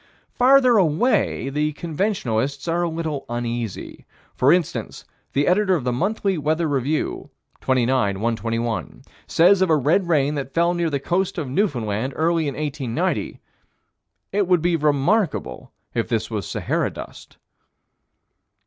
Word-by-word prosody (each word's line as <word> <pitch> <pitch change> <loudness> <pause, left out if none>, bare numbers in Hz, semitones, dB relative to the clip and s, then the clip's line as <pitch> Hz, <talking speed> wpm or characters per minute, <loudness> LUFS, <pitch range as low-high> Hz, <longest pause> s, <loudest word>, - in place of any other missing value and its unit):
Farther 255 -1 +5
away, 165 - +1
the 150 +2 -1
conventionalists 145 - -2
are 170 +1 +1
a 175 - 0
little 160 -3 -3
uneasy: 120 -3 -5 0.3
for 130 - +3
instance, 175 -3 -1 0.3
the 140 +1 +2
editor 190 +1 +3
of 155 - -2
the 125 - 0
Monthly 195 - -1
Weather 155 +3 0
Review, 145 +2 -2 0.3
29 130 -5 +1
121, 115 +1 -3 0.2
says 185 +3 +4
of 190 - +3
a 160 - +5
red 155 +6 +2
rain 150 -3 +2
that 135 -2 -5
fell 170 +1 +3
near 170 -1 0
the 140 -2 -1
coast 185 +6 -1
of 155 -5 -3
Newfoundland, 130 - -1
early 165 -1 +1
in 140 - -3
1890: 135 -5 -2 0.9
"It 200 -1 +1
would 180 -3 +3
be 175 -1 +2
very 155 -2 0
remarkable 145 - 0 0.2
if - - -1
this - - -1
was - - -3
Sahara - - -1
dust." - - -11
150 Hz, 140 wpm, -22 LUFS, 130-175 Hz, 0.9 s, Farther